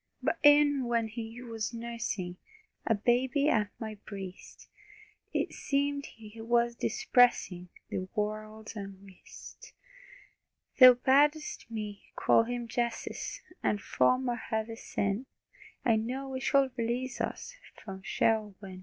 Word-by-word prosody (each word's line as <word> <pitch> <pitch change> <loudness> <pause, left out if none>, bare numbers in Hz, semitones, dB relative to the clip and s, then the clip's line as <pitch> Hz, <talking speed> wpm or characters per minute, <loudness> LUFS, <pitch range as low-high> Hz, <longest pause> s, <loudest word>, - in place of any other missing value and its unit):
But - - 0
e'en 290 -2 +6
when 230 -2 +1
He 230 +2 -7
was 225 -1 -4
nursing, 230 -6 -4 0.5
A 225 - +4
baby 250 +6 +2
at 210 -7 +2
my 220 -2 -6
breast, 195 -3 -9 0.6
It - - -1
seemed 280 0 -1
He 225 0 -12
was 235 +1 +2
dispersing 245 - +2 0.2
The 185 - -3
world's 215 +1 -4
unrest. 195 -2 -11 1.1
Thou 255 -1 +11
bad'st 290 +3 +2
me 210 -3 -6
call 230 - +4
Him 240 0 -4
"Jesus," 235 0 -3 0.2
And 210 - +1
from 255 +5 +2
our 240 -1 0
heavy 220 +1 -2
sin 205 +3 -2 0.6
I 230 -3 +4
know 265 +5 -3
He 260 - -2
shall 270 -1 +3
release 245 +2 -2
us, - - -4 0.3
From 190 -2 -7
Sheol 215 +1 +1
win. 190 -2 -9
230 Hz, 125 wpm, -30 LUFS, 210-255 Hz, 1.1 s, Thou